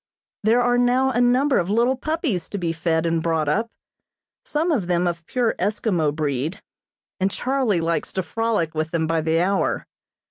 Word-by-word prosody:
There 225 +4 +3
are 245 0 +2
now 255 +2 +3
a 245 0 +1
number 255 +3 +3
of 175 - -2
little 235 +5 +2
puppies 290 - -2
to 205 - -4
be 170 -3 -1
fed 165 0 0
and 165 -1 +1
brought 160 -2 0
up, 220 +10 0 0.7
some 320 +4 -1
of 220 - 0
them 175 0 +1
of 170 -1 -2
pure 245 -3 +1
Eskimo 200 -7 0
breed, 145 +2 -2 0.6
and 190 +1 +2
Charlie 250 -5 0
likes 165 -2 -1
to 190 - -1
frolic 220 -6 -1
with 155 0 -2
them 160 -1 0
by 165 0 0
the 160 +1 +1
hour. 195 +3 0
190 Hz, 180 wpm, -22 LUFS, 165-245 Hz, 0.7 s, There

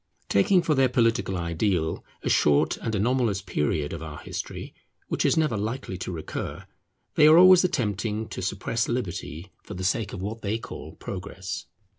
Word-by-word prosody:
Taking 175 - +4
for 155 - +2
their 135 -2 +3
political 115 -6 +1
ideal 85 0 -1 0.2
a - - -1
short 75 -1 +3
and 110 - -3
anomalous 115 -1 +1
period 75 -3 -1
of 85 - -6
our 80 -2 -7
history - - -6 0.4
which - - 0
is - - +3
never 155 -7 +2
likely 110 0 -3
to 95 - -4
recur, 80 -3 -5 0.5
they 150 - +6
are 155 +1 +8
always 185 0 +8
attempting 110 - -1
to - - -5
suppress 100 +5 -1
liberty 95 - -4
for 105 - -9
the 95 - -5
sake 100 +2 0
of 95 - -6
what 110 +3 -4
they 105 +2 -1
call - - -9
progress. 95 -2 -6
105 Hz, 170 wpm, -26 LUFS, 90-120 Hz, 0.5 s, are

